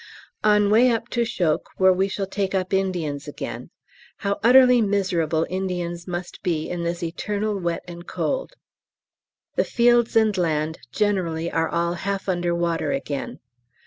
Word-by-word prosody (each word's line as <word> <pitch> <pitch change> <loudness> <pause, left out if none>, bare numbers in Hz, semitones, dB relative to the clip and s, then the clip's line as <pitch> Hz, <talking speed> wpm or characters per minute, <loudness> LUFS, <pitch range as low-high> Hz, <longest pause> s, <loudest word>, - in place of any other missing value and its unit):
On 210 -1 +4
way 240 +4 +6
up 230 0 -1
to 240 -1 +1
Chocques, 180 -9 -1
where 190 0 +5
we 190 +2 +1
shall 195 0 -3
take 195 0 -2
up 185 0 -1
Indians 170 -7 -1
again. 145 - -6 0.6
How 200 0 0
utterly 250 0 +7
miserable 180 -6 +1
Indians 180 -2 -3
must 180 0 -5
be 160 -3 -1
in 175 -1 -4
this 170 0 -3
eternal 205 +4 -2
wet 170 -2 -2
and 175 0 -9
cold. - - -2 1.0
The - - +4
fields 240 -1 +3
and 220 -2 +4
land 160 -3 -1
generally 170 -3 0
are 165 0 0
all 170 0 0
half 195 +3 -3
under 175 -2 0
water 170 -1 0
again. 150 - -4
185 Hz, 150 wpm, -23 LUFS, 170-210 Hz, 1.0 s, utterly